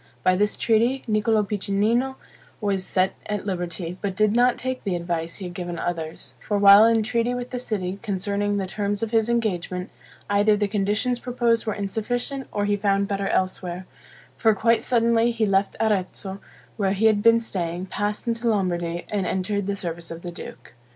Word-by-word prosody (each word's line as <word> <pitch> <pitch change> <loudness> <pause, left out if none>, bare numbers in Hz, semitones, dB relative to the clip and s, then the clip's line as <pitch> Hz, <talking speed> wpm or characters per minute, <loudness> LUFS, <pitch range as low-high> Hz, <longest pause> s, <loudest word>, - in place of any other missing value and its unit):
By 185 - +4
this 205 +2 +1
treaty, 235 +4 +2
Niccolo 215 0 +2
Piccinino 210 +6 0 0.4
was 200 -3 0
set 185 0 +1
at 210 -2 -3
liberty, 175 -2 -4
but 195 -2 -2
did 215 +1 +2
not 245 +1 +4
take 260 0 -4
the 195 -4 -1
advice 170 -1 -2
he 195 - -6
had 175 - -6
given 175 -2 -5
others; 160 -6 -4
for 205 - -1
while 200 +1 +8
in 225 -1 +3
treaty 235 +2 0
with 245 0 -5
the 250 - -3
city, 195 -5 -3
concerning 205 0 -1
the 195 - -1
terms 205 +2 -2
of 225 - -2
his 225 -1 +2
engagement, 185 -5 -1 0.4
either 205 +1 +3
the 205 0 +1
conditions 210 +5 0
proposed 240 -2 0
were 215 - 0
insufficient, 240 +6 -3
or 205 0 -1
he 205 0 +2
found 200 -1 +1
better 195 -1 -2
elsewhere; 185 -1 -1 0.5
for 220 -2 +3
quite 230 +2 +3
suddenly 235 -1 +3
he 230 -2 0
left 195 0 +1
Arezzo, 195 -2 -1 0.4
where 195 -3 +1
he 205 +3 0
had 215 -2 +4
been 230 +1 +6
staying, 180 -5 -3
passed 205 +2 -3
into 230 0 0
Lombardy, 175 -5 -1
and 200 -4 0
entered 190 +2 -1
the 200 - -1
service 170 -3 -5
of 165 0 -8
the 175 - -5
duke. 170 -8 -10
205 Hz, 185 wpm, -24 LUFS, 185-225 Hz, 0.5 s, while